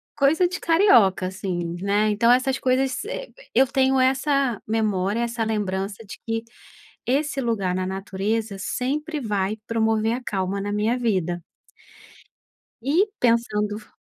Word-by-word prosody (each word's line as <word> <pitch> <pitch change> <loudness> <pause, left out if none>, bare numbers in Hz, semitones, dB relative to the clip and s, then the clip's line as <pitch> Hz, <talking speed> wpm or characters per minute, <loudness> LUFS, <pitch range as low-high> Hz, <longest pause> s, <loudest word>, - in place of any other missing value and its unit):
é 280 - +2
coisa 320 +6 +4
de 370 +1 -5
carioca, 245 - +4
assim, 180 -2 -4
né. 205 +2 +2
Então, 230 +3 +3
essas 260 +2 +3
coisas 260 +1 +1
servem - - -5 0.2
eu 265 +2 +5
tenho 265 +1 +2
essa 265 -2 +1
memória, 210 -1 0
essa 235 -1 -1
lembrança 200 -1 -2
de 200 - -9
que 225 0 -2 0.6
esse 280 +2 0
lugar 210 -7 -1
na 185 0 -1
natureza 195 +2 -2
sempre 300 +9 -2
vai 210 -3 -1
promover 225 -1 +1
a 250 - -5
calma 195 -2 -2
na 205 +1 -3
minha 215 +4 +1
vida. 185 -7 -1 1.4
E 315 - +2
pensando 215 -3 +1
f 210 - -18
225 Hz, 140 wpm, -23 LUFS, 200-260 Hz, 1.4 s, eu